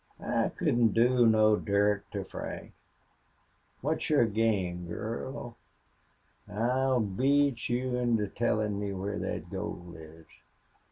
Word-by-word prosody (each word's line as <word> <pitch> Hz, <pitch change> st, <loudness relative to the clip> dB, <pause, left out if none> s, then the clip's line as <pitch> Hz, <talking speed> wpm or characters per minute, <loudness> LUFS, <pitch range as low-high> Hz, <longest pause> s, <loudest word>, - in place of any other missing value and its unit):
"I -, -, 0 dB
couldn't 115 Hz, -3 st, +2 dB
do 120 Hz, +1 st, +5 dB
no 110 Hz, -1 st, +5 dB
dirt 100 Hz, 0 st, +1 dB
to -, -, -2 dB
Frank.... -, -, -7 dB, 1.1 s
What's 155 Hz, +5 st, -1 dB
your 150 Hz, -6 st, +5 dB
game, 100 Hz, -5 st, 0 dB
girl? 115 Hz, +7 st, -5 dB, 0.9 s
I'll 125 Hz, +4 st, +1 dB
beat 130 Hz, +6 st, +1 dB
you 125 Hz, +1 st, 0 dB
into 115 Hz, -4 st, +1 dB
tellin' 105 Hz, -1 st, 0 dB
me 100 Hz, -1 st, -3 dB
where 100 Hz, +2 st, -3 dB
thet 85 Hz, +2 st, -4 dB
gold 90 Hz, -3 st, -6 dB
is." 80 Hz, 0 st, -13 dB
110 Hz, 115 wpm, -30 LUFS, 100-120 Hz, 1.1 s, do